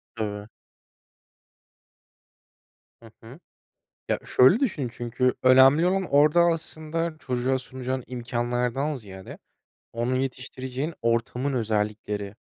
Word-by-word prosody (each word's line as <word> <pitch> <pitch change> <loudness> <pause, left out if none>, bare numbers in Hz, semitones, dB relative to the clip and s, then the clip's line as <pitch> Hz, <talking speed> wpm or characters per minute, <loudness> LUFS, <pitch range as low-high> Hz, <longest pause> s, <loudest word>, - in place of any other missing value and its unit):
Tabii. 105 -2 -4 2.6
Hı 115 - -14
hı. 125 +8 -12 0.7
Ya, - - +1
şöyle 130 - +5
düşün 155 - -1
çünkü 120 +2 0
önemli 135 +6 +6
olan 190 +1 +1
orada 150 +4 +5
aslında 165 -1 -1
çocuğa 130 0 -1
sunacağın 130 0 -5
imkânlardan 125 +3 -2
ziyade 95 -6 -10 0.6
onu 120 +2 -1
yetiştireceğin 130 +3 -4
ortamın 115 +4 0
özellikleri. 105 -3 -2
130 Hz, 90 wpm, -25 LUFS, 115-145 Hz, 2.6 s, önemli